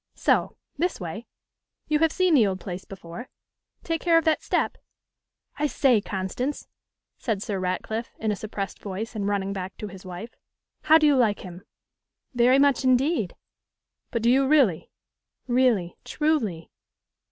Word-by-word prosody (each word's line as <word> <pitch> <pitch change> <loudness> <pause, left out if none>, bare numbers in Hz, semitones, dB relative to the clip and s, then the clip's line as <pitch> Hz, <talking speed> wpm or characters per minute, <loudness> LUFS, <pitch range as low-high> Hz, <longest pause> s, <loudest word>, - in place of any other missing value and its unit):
So, - - +1 0.2
this 355 +2 0
way. 200 +6 -6 0.6
You 300 -1 +2
have 325 0 +3
seen 370 -1 +2
the 235 -8 +5
old 190 -1 -2
Place 185 -1 -7
before? 195 +5 -9 0.5
Take 330 -1 -2
care 335 -1 +4
of 330 - +2
that 315 -1 +2
step. - - -1 0.8
I 300 - +2
say, 255 -6 +3
Constance,' 200 +10 -3 0.5
said 215 -5 -2
Sir 200 -2 -3
Ratcliffe, 200 +5 -3
in 220 -1 -1
a - - 0
suppressed 200 -1 -5
voice, 210 +4 -5
and 200 -2 -2
running 200 -1 -1
back 190 -1 -6
to 210 - -6
his 190 0 -11
wife, 185 +5 -8 0.5
'how 315 +1 +6
do 310 - +3
you 295 -2 +5
like 225 -5 +2
him?' 180 -1 -9 0.7
'Very 245 +2 +4
much 280 -1 +3
indeed.' 255 - +2 0.7
'But 230 -3 -2
do 235 - +5
you 270 +1 +4
really?' 265 - +3 0.6
'Really, 240 -8 +2
truly. 255 - -1
225 Hz, 155 wpm, -25 LUFS, 190-280 Hz, 0.8 s, how